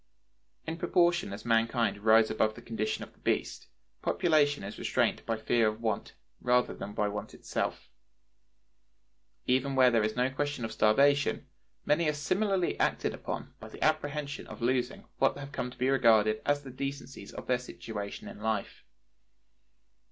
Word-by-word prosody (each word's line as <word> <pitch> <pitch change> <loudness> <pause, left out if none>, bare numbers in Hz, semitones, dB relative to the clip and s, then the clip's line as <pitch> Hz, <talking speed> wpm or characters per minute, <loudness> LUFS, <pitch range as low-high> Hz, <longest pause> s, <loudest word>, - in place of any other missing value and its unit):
In 160 +1 -4
proportion 175 - +2
as 100 +3 -8
mankind 115 -1 +2
rise 110 +1 +5
above 110 0 +1
the 120 - -10
condition 110 -2 -2
of - - -12
the - - -28
beast, - - -2 0.3
population 145 - +2
is 100 - -7
restrained - - +1
by 115 - +1
the 110 - -11
fear 115 -2 +3
of 110 +1 -2
want, 110 -3 -2 0.2
rather 125 0 +2
than 100 - -7
by 105 - 0
want 105 +1 -5
itself. - - -3 1.6
Even 130 +2 +1
where 130 -1 +6
there 115 -2 +3
is 110 0 -1
no 125 +2 +1
question 145 -3 -2
of 110 - -5
starvation, 140 +6 +3 0.4
many 150 +1 +3
are - - +1
similarly 185 +5 0
acted - - +1
upon - - -6
by - - -10
the - - -6
apprehension 145 0 -1
of - - -9
losing 125 +1 -1
what 135 - +3
have 140 0 -8
come 125 - -3
to 125 - -14
be 125 - +1
regarded 110 -5 +4
as 145 0 +2
the 135 - -9
decencies 140 +1 -6
of - - -8
their 125 -1 +1
situation 105 -4 -7
in - - -9
life. 110 -2 -2
125 Hz, 165 wpm, -30 LUFS, 110-145 Hz, 1.6 s, where